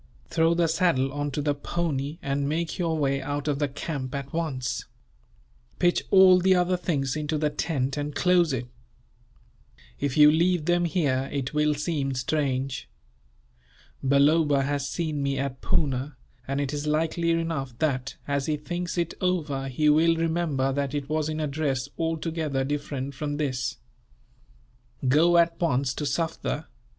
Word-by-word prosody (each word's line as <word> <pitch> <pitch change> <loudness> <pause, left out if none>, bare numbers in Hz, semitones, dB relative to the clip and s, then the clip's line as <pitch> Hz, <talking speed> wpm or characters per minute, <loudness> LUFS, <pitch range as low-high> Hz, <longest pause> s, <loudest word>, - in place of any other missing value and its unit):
Throw 165 0 +3
the 170 0 +3
saddle 160 -5 +1
on 145 0 -2
to 145 +1 -3
the 145 0 +2
pony, 145 -1 -3
and 140 +1 -1
make 165 +3 -2
your 165 -2 0
way 140 -2 +1
out 145 +2 -3
of 145 -1 0
the 145 - +1
camp, 140 -1 -5
at 140 -1 -5
once. 130 -7 -2 0.9
Pitch 175 -1 +2
all 190 -1 +7
the 190 +1 +4
other 180 0 +2
things 140 -7 -1
into 150 0 -1
the 150 0 0
tent, 140 -3 -1
and 145 0 -3
close 180 -3 +3
it. 125 -2 -2 1.3
If 140 -1 -1
you 150 0 +8
leave 170 0 +2
them 175 0 +2
here, 140 -6 0
it 140 -1 -3
will 150 0 +2
seem 145 -3 -2
strange. 130 -1 -1 1.1
Balloba 140 +1 +4
has 140 0 -1
seen 155 -4 -2
me 140 -1 0
at 135 -1 -3
Poona, 135 -2 -1 0.3
and 135 +1 -1
it 145 0 -2
is 145 +1 -3
likely 165 +2 0
enough 165 -7 -1
that, 135 -3 -1
as 140 -1 -1
he 155 -1 0
thinks 175 +4 -4
it 170 -1 0
over, 155 -7 -1
he 145 +4 0
will 160 +3 +5
remember 160 -5 0
that 140 0 -2
it 145 -1 -3
was 155 0 0
in 155 0 -3
a 155 - 0
dress 140 -2 -1
altogether 160 -4 -1
different 140 -1 -3
from 145 +2 -3
this. 135 -2 -2 1.3
Go 165 +6 +5
at 170 0 +3
once 135 -5 +1
to 150 - -4
Sufder. 160 +1 -2
150 Hz, 160 wpm, -26 LUFS, 135-165 Hz, 1.3 s, you